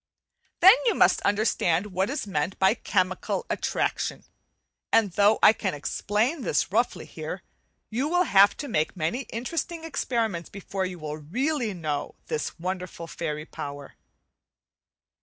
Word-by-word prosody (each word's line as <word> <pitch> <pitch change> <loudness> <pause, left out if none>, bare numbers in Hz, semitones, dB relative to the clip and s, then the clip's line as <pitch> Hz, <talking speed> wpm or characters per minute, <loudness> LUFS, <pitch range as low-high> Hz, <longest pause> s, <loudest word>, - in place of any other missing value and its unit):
Then 380 +3 +10
you 455 - +3
must - - +4
understand 200 -4 +1
what 190 +3 0
is 285 -3 -3
meant 185 -1 -2
by 190 +2 +4
chemical 185 - -1
attraction; - - -1 0.7
and 215 -4 +4
though 205 +4 +4
I - - +9
can 195 -6 -2
explain 210 - -1
this - - 0
roughly - - 0
here, - - -7 0.5
you 250 +6 0
will 355 +3 +3
have 200 - +5
to 290 - -5
make 155 - -1
many 210 +11 -2
interesting 320 +8 -4
experiments 230 - -2
before 195 -1 -4
you 180 -1 -7
will 155 -2 -5
really 245 - -1
learn 205 - -4
to 175 - -10
know 145 -2 -3
this 465 - -3
wonderful 180 -1 -5
fairy 150 -2 -4
power. 145 -3 -8
200 Hz, 145 wpm, -26 LUFS, 170-245 Hz, 0.7 s, Then